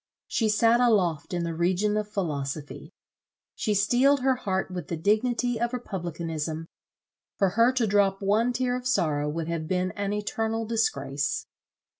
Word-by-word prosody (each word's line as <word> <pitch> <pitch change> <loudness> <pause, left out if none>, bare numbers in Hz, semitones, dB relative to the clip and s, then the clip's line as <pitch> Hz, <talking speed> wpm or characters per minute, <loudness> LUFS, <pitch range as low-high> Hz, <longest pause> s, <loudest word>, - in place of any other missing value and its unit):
She 220 -2 0
sat 230 +2 +4
aloft 200 -10 +2
in 175 -1 -1
the 170 -1 -2
region 185 +5 +1
of 210 -1 -2
philosophy. 145 -7 -4 0.6
She 210 - -1
steeled 250 +7 +3
her 265 0 +3
heart 190 -6 -2
with 180 -1 -5
the 170 - -3
dignity 230 +6 +1
of 235 +1 0
republicanism; 165 -7 -4 0.7
for 195 - +3
her 230 +6 +4
to 250 -3 +1
drop 200 -2 +2
one 215 +5 +2
tear 245 0 0
of 250 0 -4
sorrow 150 -11 +1
would 160 +1 -3
have 165 -2 -3
been 185 +1 0
an 200 +1 -3
eternal 220 +2 -2
disgrace. 140 -11 -1
200 Hz, 155 wpm, -27 LUFS, 170-230 Hz, 0.7 s, sat